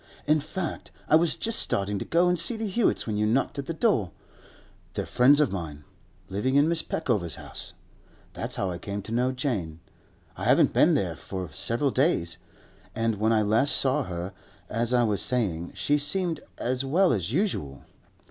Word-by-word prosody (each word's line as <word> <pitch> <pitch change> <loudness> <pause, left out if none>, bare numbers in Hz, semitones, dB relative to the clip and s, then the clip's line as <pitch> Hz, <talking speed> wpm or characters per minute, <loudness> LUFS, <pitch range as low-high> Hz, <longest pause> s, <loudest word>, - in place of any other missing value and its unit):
'In 155 +1 +3
fact, 170 +3 -5 0.2
I - - +5
was 165 0 +3
just 230 0 +1
starting 100 0 -1
to - - -5
go 170 +2 +3
and 180 -1 +2
see 225 +8 +2
the 220 - -3
Hewetts 215 +4 +1
when 110 -2 -2
you 105 0 +1
knocked 125 +5 0
at 140 - -5
the - - -2
door. 160 - +1 0.8
They're - - -3
friends 140 +4 +4
of 150 - +2
mine—living 95 - -5
in 145 +1 +5
Mrs. 165 0 +1
Peckover's 105 - -1
house. - - -7 0.6
That's - - -2
how 95 -2 -1
I 85 - -6
came 100 0 -5
to 110 - -9
know 125 +3 +1
Jane. 105 - -3 0.6
I - - -6
haven't - - +4
been - - +4
there - - -1
for 95 -2 -6
several 130 +4 0
days, 90 - +1 0.6
and 115 -1 0
when 110 +2 +1
I 110 -1 +3
last 110 +7 +3
saw 135 +2 +2
her, 90 +1 -5 0.4
as 115 +2 -1
I 125 -1 +3
was 105 -3 +1
saying, 90 -9 -1
she 145 0 +1
seemed 170 +3 +1 0.2
as 130 +2 -1
well 170 +6 +3
as 95 -2 -2
usual. 130 - -2
120 Hz, 185 wpm, -26 LUFS, 100-150 Hz, 0.8 s, I